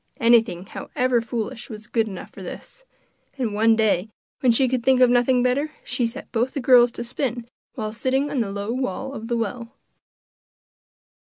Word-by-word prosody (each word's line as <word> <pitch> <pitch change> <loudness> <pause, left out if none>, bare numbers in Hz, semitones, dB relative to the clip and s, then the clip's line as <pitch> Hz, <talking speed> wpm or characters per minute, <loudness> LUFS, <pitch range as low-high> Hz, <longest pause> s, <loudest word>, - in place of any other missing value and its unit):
Anything, 230 -6 +3
however 250 +3 -1
foolish, 230 +2 -5
was 215 -2 -8
good 225 -1 0
enough 190 -3 -8
for - - -12
this, - - -9 0.5
and 240 -5 -2
one 225 +2 +4
day, 215 -2 +1 0.3
when 255 -4 +4
she 260 +3 +3
could 250 -1 -1
think 260 0 +4
of 250 -1 +6
nothing 245 0 +3
better, 280 +5 0
she 240 -3 -1
set 245 +4 -9
both 245 +3 -1
the - - -1
girls 245 -2 +6
to - - -5
spin 240 -1 -3 0.3
while 215 -3 -4
sitting 265 +5 0
on 275 - -1
the 215 -4 -1
low 200 +2 -3
wall 255 +1 -3
of 225 -3 -7
the 235 0 0
well. 230 +3 -4
240 Hz, 180 wpm, -23 LUFS, 225-255 Hz, 0.5 s, of